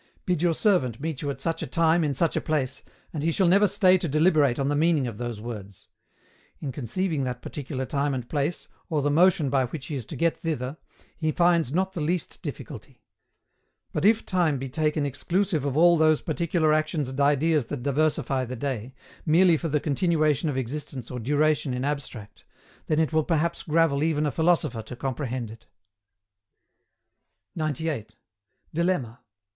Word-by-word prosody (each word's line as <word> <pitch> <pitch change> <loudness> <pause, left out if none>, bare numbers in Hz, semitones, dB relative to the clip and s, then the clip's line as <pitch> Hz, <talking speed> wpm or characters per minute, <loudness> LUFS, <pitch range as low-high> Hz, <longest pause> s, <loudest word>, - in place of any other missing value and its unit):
Bid 180 -4 0
your 170 -2 +2
servant 145 - +1
meet 155 -2 -4
you 145 - -2
at 140 - -4
such 165 -1 -2
a - - -3
time 165 0 +2
in 145 -2 0
such 165 +4 +1
a - - 0
place, 140 -4 -2 0.3
and 155 - -3
he 165 +2 +1
shall 185 +2 +2
never 200 +4 +5
stay 185 -1 +4
to 175 - -2
deliberate 150 -4 +3
on 135 - 0
the 145 - +1
meaning 155 -2 +2
of 115 -3 -6
those 120 -3 -4
words; 105 -4 -9 0.7
in 140 - -4
conceiving 145 - -2
that 125 -1 -4
particular 135 -2 -5
time 140 +1 -1
and 125 -2 -5
place, 150 +4 -2 0.2
or 150 -3 0
the 145 - +2
motion 170 -1 +4
by 135 -2 +2
which 135 +2 -7
he 150 - -5
is 125 -5 -5
to - - -7
get 165 0 +1
thither, 155 -4 -3 0.4
he 155 -1 -1
finds 170 -5 +2
not 190 +4 0
the 170 - -4
least 170 +3 -2
difficulty. - - -8 0.9
But - - -1
if 220 +2 +4
time 170 -6 +1
be 135 +1 -5
taken 150 +1 0
exclusive 165 +2 -1
of 140 0 -1
all 170 +1 +6
those 155 -1 +3
particular 160 -1 +1
actions 155 -3 0
and 130 +2 -6
ideas 145 -1 +2
that 135 -2 -5
diversify 140 -2 0
the 125 +1 -6
day, 130 -1 -4 0.3
merely 170 +2 +5
for 165 +1 -3
the 150 0 +1
continuation 155 0 +1
of 135 - -2
existence 130 -1 -5
or 125 - -4
duration 145 +2 +1
in 125 +2 -2
abstract, 135 -8 -5 0.4
then 155 - +1
it 160 0 +1
will 155 0 +3
perhaps 170 +1 0
gravel 155 -3 +2
even 155 -1 +1
a 145 - 0
philosopher 160 -8 +1
to 110 +3 -9
comprehend 130 -3 -3
it. 115 +1 -14 1.9
98. 155 -8 -3 0.6
DILEMMA. 155 -9 -1
150 Hz, 180 wpm, -26 LUFS, 130-165 Hz, 1.9 s, all